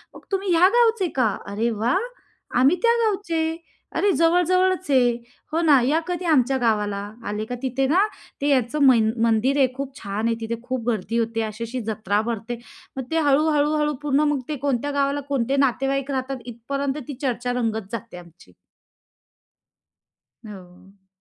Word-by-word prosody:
मग, - - -11
"तुम्ही 390 -1 0
ह्या 355 +3 +6
गावचे 455 -6 +3
का? 250 -4 +3 0.2
अरे 230 +3 0
वाह! 245 - +3 0.6
आम्ही 270 +7 +5
त्या 470 0 +5
गावचे. 375 -6 -1 0.5
अरे 405 - +3
जवळ-जवळच 360 +1 +2
आहे. 250 -3 +4 0.4
हो 325 +2 +1
ना, 300 -5 +5
या 285 +6 +2
कधी 360 0 -3
आमच्या 270 -5 +3
गावाला. 210 -3 +1 0.3
आले 210 +1 -3
का 245 - -5
तिथे 265 0 0
ना 335 +7 +3 0.4
ते 285 - 0
याचं 260 +1 +1
मन 230 -4 +5
मंदिर 230 +5 +2
आहे 270 -2 +5
खूप 275 0 -6
छान 205 +2 -2
आहे 230 - +1
तिथे, 225 +1 -2
खूप 250 -2 -4
गर्दी 225 0 -1
होते, 225 0 -1
अशी-अशी 230 +3 -4
जत्रा 210 -1 0
भरते." 230 +1 -4 0.4
मग 265 - -2
ते 325 - +2
हळू-हळू-हळू 300 +1 +2
पूर्ण 290 -1 +1
मग 280 - -1
ते 300 - -1
कोणत्या 280 +1 0
गावाला 280 0 0
कोणते 270 -1 0
नातेवाईक 270 +2 -1
राहतात 265 0 -2
इथपर्यंत 270 +4 -3
ती 285 - -5
चर्चा 245 -2 -1
रंगत 220 -3 -3
जाते 225 -6 -6
आमची. 170 - -15 1.9
हो. 190 -1 -14
260 Hz, 160 wpm, -23 LUFS, 225-295 Hz, 1.9 s, ह्या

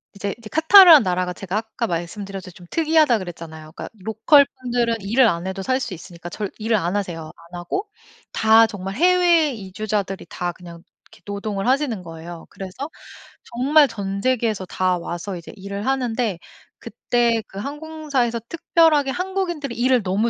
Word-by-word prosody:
이제 200 0 -3
그 215 - -10
카타르라는 320 - +8
나라가 180 -1 -1
제가 195 +2 -4
아까 225 +1 -3
말씀드렸 190 +3 -5
듯이 185 -1 -13
좀 180 - -14
특이하다 315 -6 +3
그랬잖아요. 160 -3 -9
그러니까 - - -8
로컬 220 +8 +4 0.2
분들은 240 -2 0
일을 230 +6 +3
안 170 -3 -1
해도 190 0 -4
살 255 +6 0
수 235 -7 -4
있으니까 175 0 -10
절 205 +2 -4
일을 220 0 +1
안 180 0 -2
하세요 175 -5 -3
안 170 +1 -11
하고 390 - -3 0.4
다 220 +1 +5
정말 195 -3 -6
해외 345 -1 +4
이주자들이 200 -3 -4
다 175 0 -3
그냥 170 -2 -12 0.3
이렇게 - - -19
노동을 200 0 -4
하시는 260 -6 +1
거예요. 165 0 -10
그래서 195 +10 -7 0.5
정말 280 +5 +3
전 200 -3 -5
세계에서 230 -6 0
다 185 0 0
와서 175 +3 -5
이제 170 - -9
일을 200 +1 -6
하는데 245 -7 -1 0.4
그때 235 0 0
그 195 - -9
항공사에서 290 -3 -2
특별하게 320 -4 +2
한국인들이 355 -7 -3
일을 250 0 +2
너무 200 +5 0
215 Hz, 375 characters per minute, -21 LUFS, 185-265 Hz, 0.5 s, 카타르라는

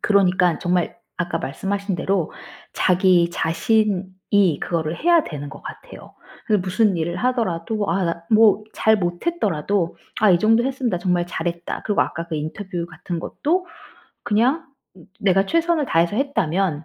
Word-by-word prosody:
그러니깐 185 -4 +3
정말 175 -1 0 0.2
아까 175 -1 -1
말씀하신 195 +8 -3
대로 175 -1 -1 0.4
자기 180 -1 +3
자신이 190 -2 +1
그거를 165 -1 -2
해야 340 0 +3
되는 145 -2 -6
것 - - -11
같아요. - - -11 0.3
그래서 210 -3 +3
무슨 190 +1 +2
일을 170 +1 -2
하더라도 220 -4 -1
아 190 +3 +1
나 170 0 -3
뭐 215 -1 +5
잘 220 0 +3
못했더라도 180 - -1 0.2
'아 215 -2 +5
이 175 - +5
정도 225 +4 +3
했으면 265 -1 -1
나 180 - 0
정말 175 -1 0
잘했다.' 170 0 -4
그리고 205 - +1
아까 170 - -5
그 165 - -4
인터뷰 170 +3 -4
같은 170 0 -6
것도 360 - -1 0.6
그냥 255 +10 +1 0.5
내가 195 -1 +3
최선을 335 - +1
다해서 170 0 +1
했다면 190 - 0
185 Hz, 315 characters per minute, -22 LUFS, 170-215 Hz, 0.6 s, 뭐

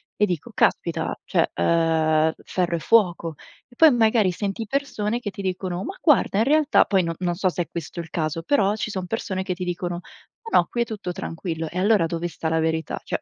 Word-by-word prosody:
e 210 - +3
dico: 175 -6 -4
"Caspita, - - +1
cioè, - - +1
ehm, 160 - +2
ferro 175 -2 -1
e - - -2
fuoco". 175 -5 +2 0.3
E 245 - -21
poi 320 +3 +7
magari 220 -5 +3
senti 200 +4 -3
persone 235 -3 -2
che 225 - -4
ti 200 0 -8
dicono: 185 -1 -3
"Ma 390 - -5
guarda 290 - +3
in - - +4
realtà" 305 +1 +4
poi 195 -3 +2
no 165 0 -2
non 175 -1 -1
so 185 +1 +1
se 175 0 -2
è - - -17
questo 170 0 -6
il 165 -1 -6
caso. 155 0 -2
Però 205 -2 +2
ci 215 - -3
son 190 -2 -3
persone 190 -3 -3
che 190 -1 -2
ti 180 +1 -5
dicono: 175 -1 -3 0.5
"Ma - - +4
no, - - +2
qui 240 - -1
è - - +2
tutto 210 -5 -5
tranquillo". 165 -3 -5
E 175 - -7
allora 200 -2 +3
dove 170 +1 -3
sta 160 -1 -4
la 160 0 +1
verità? 160 0 -1
Cioè - - -3
185 Hz, 225 wpm, -23 LUFS, 165-215 Hz, 0.5 s, poi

